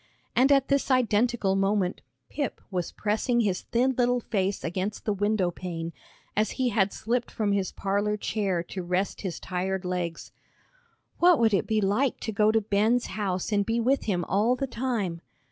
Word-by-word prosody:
And 265 +3 +5
at 275 -1 +4
this 280 0 +1
identical 235 -4 +2
minute 195 -1 +1 0.3
Pip 285 -4 -3
was 180 -3 -2
pressing 220 +3 0
his 195 -5 0
thin 255 +3 +1
little 245 0 +3
face 195 -4 -1
against 185 +5 -3
the 210 - +1
window 205 -2 +1
pane, 170 -2 -5 0.4
as 215 +1 +2
he 255 -2 +2
had 200 -3 +2
slipped 235 +2 -2
from 210 -2 -1
his 195 -2 0
parlor 205 +2 -1
chair 195 -5 -1
to 185 +2 -6
rest 180 +3 -1
his 185 -4 -4
tired 185 +1 -3
legs. 180 -2 -3 0.9
"What 350 -1 +6
would 225 -3 +3
it 195 - +1
be 220 -1 +1
like 215 +7 +1
to 220 - -3
go 210 +1 +3
to 225 0 +2
Ben's 215 +4 +2
house 190 -2 -2
and 205 -1 +2
be 225 +3 0
with 260 +4 +1
him 180 -5 0
all 215 +6 +2
the 275 - -2
time?" 230 -9 -2
210 Hz, 180 wpm, -27 LUFS, 190-235 Hz, 0.9 s, What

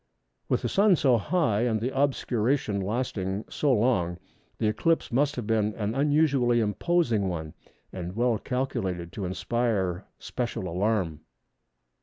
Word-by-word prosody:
With - - +1
the - - +1
Sun 200 -1 +4
so 130 -7 +3
high 115 - +1
and 115 -2 +1
the 125 +5 -3
obscuration 130 -5 +1
lasting 100 -2 -2
so 145 - +1
long, 105 -8 +2 0.4
this 110 -2 +1
eclipse 165 +10 0
must 140 +4 +2
have 120 - -4
been 110 -1 +1
an 105 0 -2
unusually 140 -3 +3
imposing 115 - +1
one, 80 -3 -5 0.4
and 90 0 -5
well 120 -1 +1
calculated 110 -10 -3
to 100 - -5
inspire 95 0 -1
special 120 -6 -4
alarm. 90 -3 -1
115 Hz, 135 wpm, -27 LUFS, 95-130 Hz, 0.4 s, Sun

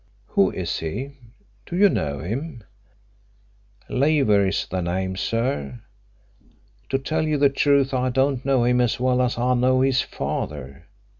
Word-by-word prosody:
"Who - - +3
is - - -3
he? 110 - -4 0.6
Do 175 - -5
you 205 +2 +6
know 70 - -2
him?" 120 - -5 1.2
"Leaver 130 -8 +2
is 95 - -1
the 95 - -3
name, 95 +2 -2
sir. 95 - -2 1.1
To 135 - +1
tell 155 +3 -2
you 155 -1 +1
the 140 0 +4
truth, 140 0 +2
I 130 0 +1
don't 135 0 +1
know 135 -3 +2
him 125 +1 +3
as 120 -1 0
well 125 0 +2
as 125 -2 0
I 125 +1 +1
know 130 +1 +2
his 130 -1 +3
father. 70 -2 -5
125 Hz, 150 wpm, -23 LUFS, 100-135 Hz, 1.2 s, you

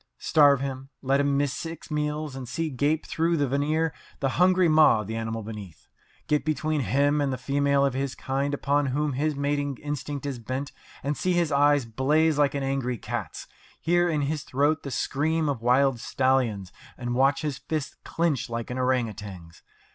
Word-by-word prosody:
Starve 145 -3 +4
him, 135 -1 -5
let 135 +1 +2
him 140 -1 +2
miss 140 -1 +1
six 165 -1 -7
meals, 150 -1 -2
and 130 -3 -7
see 165 +2 -2
gape 145 +4 0
through 165 +1 0
the 145 -2 +1
veneer 150 +4 0 0.3
the 135 - +1
hungry 185 0 +5
maw 155 -8 +5
of - - -7
the 110 - -4
animal 115 0 -3
beneath. 105 -6 -9 0.4
Get 150 -1 +1
between 155 -1 0
him 140 +6 +2
and 140 -1 0
the 130 - -2
female 140 +1 +2
of 135 - 0
his 135 0 -2
kind 140 +2 -1
upon 145 0 +1
whom 145 +2 0
his 150 +3 0
mating 145 -1 -1
instinct 145 -1 -4
is 135 -4 -3
bent, 130 +4 -4 0.3
and 145 +2 -1
see 185 +4 0
his 170 -3 +1
eyes 145 -1 +4
blaze 150 +6 +2
like 145 -1 +3
an 140 - -1
angry 135 -2 -1
cat's, 110 -6 -5 0.3
hear 175 +1 +2
in 155 -3 0
his 145 +1 -1
throat 145 +5 +1
the 140 - -6
scream 155 +4 0
of 135 -6 -2
wild 125 +1 +3
stallions, 120 -8 0 0.3
and 120 -1 -3
watch 135 +6 +2
his 145 -3 -3
fists 155 -3 -4
clench 165 -8 -1
like 115 +1 -4
an 125 - -3
orang 125 -2 +2
outang's. 95 -6 -10
140 Hz, 190 wpm, -26 LUFS, 130-150 Hz, 0.4 s, hungry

